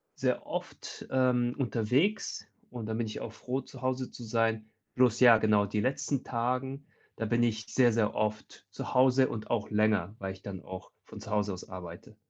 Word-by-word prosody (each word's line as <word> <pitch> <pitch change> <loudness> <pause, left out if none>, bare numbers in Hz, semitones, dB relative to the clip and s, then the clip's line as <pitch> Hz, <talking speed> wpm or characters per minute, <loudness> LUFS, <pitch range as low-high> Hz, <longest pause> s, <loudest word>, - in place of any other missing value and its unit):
sehr - - 0
oft, - - -6
ähm, 125 -2 +2
unterwegs 135 - 0 0.2
und 120 -3 -6
dann 110 0 -2
bin 115 -1 -1
ich 105 - -6
auch 115 - -5
froh, 130 +3 -3
zu 130 0 -13
Hause 130 0 -1
zu 120 - -9
sein. 115 -1 0 0.3
Bloß 125 -3 +4
ja, 120 -3 +9
genau, 105 -1 +3
die 105 +1 -2
letzten 135 +1 -1
Tagen, 130 +3 -2 0.3
da 115 - -4
bin 120 +2 +2
ich 110 -3 0
sehr, 120 -3 +5
sehr 110 -2 +1
oft 105 0 -3
zu - - -6
Hause 130 +1 +5
und 110 -1 -6
auch 115 -3 0
länger, 105 -3 +2
weil 95 -1 -3
ich 95 - -15
dann 95 -2 -7
auch 95 0 -9
von - - -10
zu 105 - -9
Hause 105 -2 +1
aus 90 - -9
arbeite. 90 -2 -9
115 Hz, 195 wpm, -30 LUFS, 105-125 Hz, 0.3 s, ja